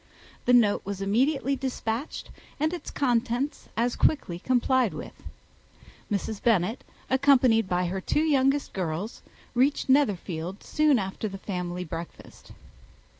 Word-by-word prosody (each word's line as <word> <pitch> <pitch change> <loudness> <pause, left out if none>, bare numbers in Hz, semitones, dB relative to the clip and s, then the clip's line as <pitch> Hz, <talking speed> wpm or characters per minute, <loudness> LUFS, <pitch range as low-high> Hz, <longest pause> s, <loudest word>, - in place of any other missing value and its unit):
The 245 - +4
note 225 -4 +4
was 200 0 -5
immediately 265 +8 +1
despatched, 260 0 -4 0.3
and 310 +3 +1
its 350 - -6
contents 255 +2 -1
as 240 +1 +1
quickly 175 - +1
complied 255 0 +2
with. - - -7 1.0
Mrs. 205 +1 -2
Bennet, 220 +1 +1 0.2
accompanied 255 -6 +4
by 180 0 +1
her 190 +2 -3
two 300 - +1
youngest 280 -2 +2
girls, 185 +3 -3 0.3
reached 270 +3 +1
Netherfield 195 - +1
soon 300 -3 +3
after 195 +1 -3
the 195 -1 -6
family 180 -2 -4
breakfast. 165 0 -9
230 Hz, 125 wpm, -27 LUFS, 190-270 Hz, 1.0 s, The